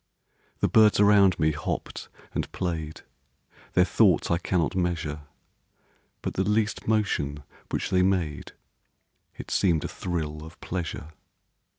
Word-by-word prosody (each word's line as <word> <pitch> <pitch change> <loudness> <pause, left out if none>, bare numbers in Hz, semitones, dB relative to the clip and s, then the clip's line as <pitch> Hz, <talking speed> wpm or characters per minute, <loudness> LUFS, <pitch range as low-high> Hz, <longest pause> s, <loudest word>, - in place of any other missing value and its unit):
The - - +3
birds 110 -2 +5
around 100 -2 +5
me 80 0 +3
hopp'd 75 -1 -4 0.3
and - - -3
play'd, 80 -4 -4 0.7
Their 90 - +5
thoughts 95 -6 +3
I 85 - +2
cannot 90 0 0
measure 80 -5 -2 1.0
But - - -3
the 95 - 0
least 105 +2 0
motion 75 -10 0 0.3
which - - -2
they 90 - +4
made 90 -6 -1 0.8
It - - -8
seem'd 85 -5 +2
a - - -2
thrill 80 -4 -4
of 80 +2 -12
pleasure. 85 -3 -5
90 Hz, 125 wpm, -26 LUFS, 80-95 Hz, 1.0 s, birds